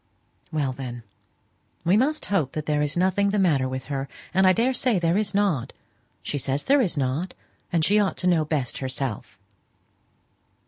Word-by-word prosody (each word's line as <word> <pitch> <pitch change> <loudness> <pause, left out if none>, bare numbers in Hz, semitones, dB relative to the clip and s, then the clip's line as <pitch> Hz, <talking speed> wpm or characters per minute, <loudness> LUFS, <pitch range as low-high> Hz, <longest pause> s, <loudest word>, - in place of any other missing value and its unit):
"Well, 145 -4 -1
then 125 -2 -7 0.8
we 175 +4 +4
must 285 +8 +2
hope 155 -9 +1
that 155 -1 -4
there 150 -1 +1
is 150 +2 -1
nothing 190 +3 +2
the 205 - 0
matter 150 -9 +2
with 130 0 -4
her; 135 -1 -4 0.2
and 190 +1 +4
I - - +7
daresay 245 +2 +2
there 170 0 +1
is 205 -1 0
not. 170 - +1 0.5
She 145 - -3
says 135 +2 -1
there 280 0 +4
is 180 -9 0
not, 140 +7 -1 0.4
and 165 -2 +2
she 210 +2 +4
ought 200 -2 0
to - - -6
know 170 -3 +3
best 145 -5 -2
herself." 130 -7 -3
160 Hz, 175 wpm, -25 LUFS, 135-195 Hz, 0.8 s, I